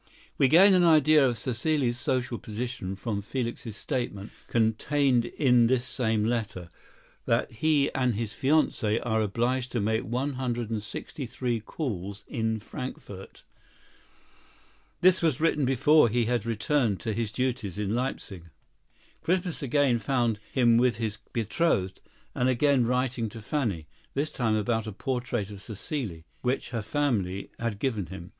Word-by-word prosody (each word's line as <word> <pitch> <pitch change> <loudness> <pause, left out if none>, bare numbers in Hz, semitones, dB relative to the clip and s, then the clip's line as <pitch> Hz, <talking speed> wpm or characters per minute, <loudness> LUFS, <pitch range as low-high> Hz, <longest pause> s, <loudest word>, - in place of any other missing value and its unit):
We 135 - +6
gain 185 +8 +7
an 180 -1 +5
idea 155 -2 +6
of 120 - -2
Cécile's 125 +1 0
social 125 -2 -1
position 110 -3 -5
from 100 +1 -3
Felix's 120 0 -4
statement, 120 -7 -3 0.2
contained 120 +3 +2
in 125 -2 +3
this 125 0 +1
same 110 -5 0
letter, 110 -7 -2 0.6
that - - +1
he 145 +4 +1
and 125 -4 +1
his 110 0 -3
fiancée 130 -6 +2
are 110 -2 +1
obliged 120 +4 -1
to 120 - +1
make 110 +2 +1
one 130 +5 -2
hundred 120 -3 -3
and 110 -2 -1
sixty 120 +6 -7
three 120 0 -2
calls 100 - -5
in 110 -3 -1
Frankfort. 100 -4 -8 1.6
This 185 +1 +5
was 160 -6 +1
written 155 -3 +2
before 135 +1 +5
he 120 +1 +1
had 115 -1 -1
returned 115 - +1
to 110 - -2
his 110 0 -2
duties 120 -6 -2
in 105 0 -1
Leipsic. 120 -7 -3 0.8
Christmas 180 -1 -1
again 135 -2 +2
found 120 -2 0
him 120 -3 +4
with 125 0 +3
his 110 -2 -3
betrothed 110 - 0 0.3
and 125 +1 +1
again 130 -1 +3
writing 125 -2 0
to 115 - -9
Fanny—this 115 - -3
time 115 -4 0
about 110 +1 0
a - - -3
portrait 120 -2 -3
of 100 - -9
Cécile, 105 - -5 0.2
which 125 +1 -1
her 115 -3 -2
family 105 -6 -1
had 115 -3 -2
given 105 -6 -2
him. 90 0 -9
120 Hz, 145 wpm, -27 LUFS, 110-130 Hz, 1.6 s, gain